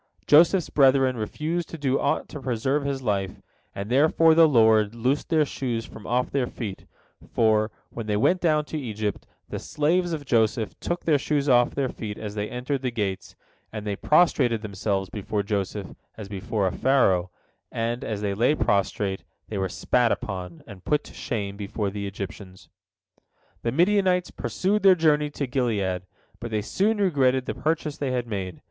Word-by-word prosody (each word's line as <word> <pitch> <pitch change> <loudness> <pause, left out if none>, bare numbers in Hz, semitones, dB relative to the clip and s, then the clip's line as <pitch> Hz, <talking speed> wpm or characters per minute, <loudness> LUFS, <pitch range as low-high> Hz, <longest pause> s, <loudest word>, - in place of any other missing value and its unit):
Joseph's 170 +4 +5
brethren 135 -2 +4
refused 155 +10 -3
to 165 - -7
do 135 -3 0
aught 140 - 0
to 145 - -8
preserve 130 +3 -1
his 135 -1 -2
life, 100 -4 -1 0.4
and 100 +1 -4
therefore 155 +6 +4
the 165 0 +7
Lord 110 -5 +4
loosed 130 +5 -1
their 160 -2 +3
shoes 120 -5 -3
from 110 - -11
off 125 +1 0
their 135 -3 0
feet, 105 -7 -7 0.4
for, 110 -1 +3 0.2
when 115 -2 -6
they 105 -1 +1
went 180 - +2
down 155 -3 +2
to 155 - -4
Egypt, 110 -5 -4 0.2
the - - -4
slaves 170 +4 0
of 150 -3 -4
Joseph 110 -3 +1
took 175 0 -3
their 150 -3 +3
shoes 145 0 0
off 120 -2 +4
their 135 -2 0
feet 105 -4 -6
as 105 -2 -6
they 105 0 -3
entered 130 +2 -3
the 130 - -1
gates, 105 -5 -4 0.4
and 105 -1 -6
they 100 -1 -2
prostrated 130 - +3
themselves 100 -1 -2
before 105 0 -2
Joseph 100 -1 -3 0.2
as 105 -3 -7
before 100 +1 -2
a 95 - +1
Pharaoh, 95 -10 +2 0.4
and, 115 +1 -2
as 105 -2 -3
they 100 -1 -1
lay 120 +9 +2
prostrate, 100 -4 0 0.3
they 105 - -3
were 95 -1 -1
spat 120 +5 +1
upon, 90 -4 -4
and 95 -3 -12
put 150 -1 +1
to - - -13
shame 100 -5 -4
before 100 0 -3
the 100 0 -4
Egyptians. 95 -1 -8 0.9
The 115 - -1
Midianites 180 - +2
pursued 205 +3 -1
their 190 -1 +7
journey 150 -3 +2
to 145 -1 -3
Gilead, 105 -8 -1 0.3
but 120 - -6
they 105 -2 -1
soon 210 - +1
regretted 135 -10 +2
the - - -3
purchase 155 -1 -2
they 140 - -1
had 125 -1 -1
made. 95 -5 -5
120 Hz, 180 wpm, -25 LUFS, 105-145 Hz, 0.9 s, the